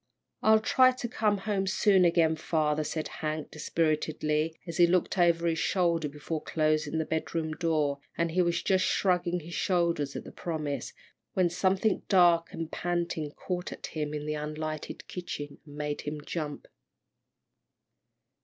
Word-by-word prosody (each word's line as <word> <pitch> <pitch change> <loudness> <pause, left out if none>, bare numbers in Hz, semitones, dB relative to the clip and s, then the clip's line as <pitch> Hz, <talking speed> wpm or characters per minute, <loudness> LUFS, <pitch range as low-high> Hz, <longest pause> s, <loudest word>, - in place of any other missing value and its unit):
"I'll 220 0 +6
try 255 +3 +5
to 250 -1 -4
come 215 -3 +1
home 195 -1 -1
soon 190 -1 +4
again, 165 -2 +3
father," 155 -1 0
said 155 +1 -3
Hank, 155 -1 -4
dispiritedly, 155 0 0
as 170 -2 -5
he 175 - +7
looked 180 +3 +1
over 170 -1 +4
his 165 -1 +1
shoulder 170 -5 +1
before 150 +2 -4
closing 155 0 0
the 160 - 0
bedroom 160 0 -2
door, 155 -3 0 0.2
and 170 -1 +1
he 180 +3 +2
was 170 -1 +1
just 190 -1 +3
shrugging 180 -2 +1
his 170 +3 -9
shoulders 170 -6 0
at - - -4
the - - -10
promise, 150 -6 -4 0.4
when 180 -2 +2
something 190 +3 +1
dark 175 -3 +5
and 165 -1 -5
panting 170 -3 -2
caught 180 -1 -4
at - - -7
him 150 -2 -3
in 150 0 -4
the 150 - -1
unlighted 155 +1 -5
kitchen, 145 -5 -6
and 145 - -11
made 150 0 -3
him 150 0 -5
jump. 150 -4 -4
165 Hz, 155 wpm, -29 LUFS, 155-180 Hz, 0.4 s, he